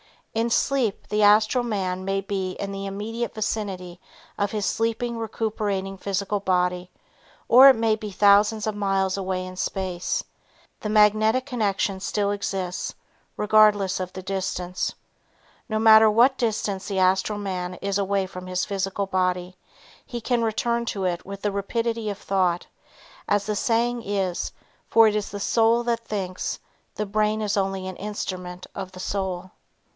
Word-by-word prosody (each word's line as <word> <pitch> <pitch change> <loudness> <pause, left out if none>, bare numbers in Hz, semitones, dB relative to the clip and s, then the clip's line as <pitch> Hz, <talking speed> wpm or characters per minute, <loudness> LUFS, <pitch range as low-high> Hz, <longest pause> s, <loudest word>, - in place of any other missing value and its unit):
In 225 +1 0
sleep 245 -3 0
the 210 0 +1
astral 215 +4 +5
man 190 -5 -2
may 195 0 0
be 195 -1 -3
in 200 +1 -5
the 195 0 -5
immediate 220 +4 -4
vicinity 195 -5 -3 0.4
of 200 0 0
his 210 -2 -2
sleeping 230 +3 -1
recuperating 210 -4 -2
physical 200 +1 -2
body 180 -1 0 0.6
or 260 +3 +9
it 265 - +6
may 225 -1 +2
be 215 -1 -6
thousands 205 +2 +4
of 215 - -1
miles 195 -2 0
away 185 -1 -2
in 185 0 -9
space, 185 -2 -2 0.6
the 215 - -4
magnetic 215 +4 +4
connection 205 -6 -1
still 200 +1 -1
exists 190 -3 -3 0.4
regardless 210 -2 +4
of 185 -1 -5
the 185 - -7
distance. 185 -2 -3 0.7
No 220 - 0
matter 220 0 +7
what 245 +5 +4
distance 210 -4 -1
the 195 - -3
astral 190 +3 +2
man 185 -3 -4
is 200 +2 -2
away 195 -1 0
from 185 -1 -9
his 180 0 -1
physical 195 0 -2
body, 185 -1 -1 0.5
he 240 -1 -6
can 240 +1 0
return 235 +1 0
to 195 -4 -2
it 175 -2 -1
with 200 0 -8
the 205 - +1
rapidity 225 +2 -2
of 200 - -4
thought, 185 -4 0 0.6
as 205 0 +1
the 210 - -1
saying 235 +3 +1
is, 195 -4 -2 0.4
for 225 -1 +6
it 210 - -2
is 210 -1 -2
the 205 0 -6
soul 230 +2 +3
that 235 -1 0
thinks, 185 -3 -3 0.4
the 210 - -2
brain 215 +1 0
is 205 -1 0
only 195 -1 -1
an 185 -1 -6
instrument 185 -3 -5
of 185 -1 -6
the 185 - -10
soul. 185 -1 -3
200 Hz, 160 wpm, -24 LUFS, 190-220 Hz, 0.7 s, or